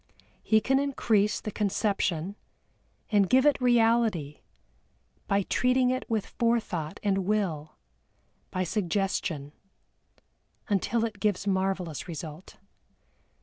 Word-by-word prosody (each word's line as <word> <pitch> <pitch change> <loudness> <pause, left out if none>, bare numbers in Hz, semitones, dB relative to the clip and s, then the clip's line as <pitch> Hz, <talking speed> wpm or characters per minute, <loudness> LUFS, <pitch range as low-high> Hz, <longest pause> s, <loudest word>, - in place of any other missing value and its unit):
He 220 0 +3
can 270 +3 +2
increase 225 -7 +1
the 215 - -5
conception, 200 -3 -1 0.8
and 200 -3 +3
give 260 +2 +4
it 290 -3 +3
reality, 225 - +2 0.9
by 200 -1 +2
treating 250 +4 +2
it 255 +1 -3
with 220 -3 0
forethought 220 -10 -1
and 195 -1 +2
will, 185 -6 -1 0.7
by 185 - -1
suggestion, 180 -6 -2 1.2
until 220 +3 +1
it 215 -3 -6
gives 205 -1 0
marvellous 190 -5 -1
result. 160 0 -8
200 Hz, 105 wpm, -28 LUFS, 180-230 Hz, 1.2 s, give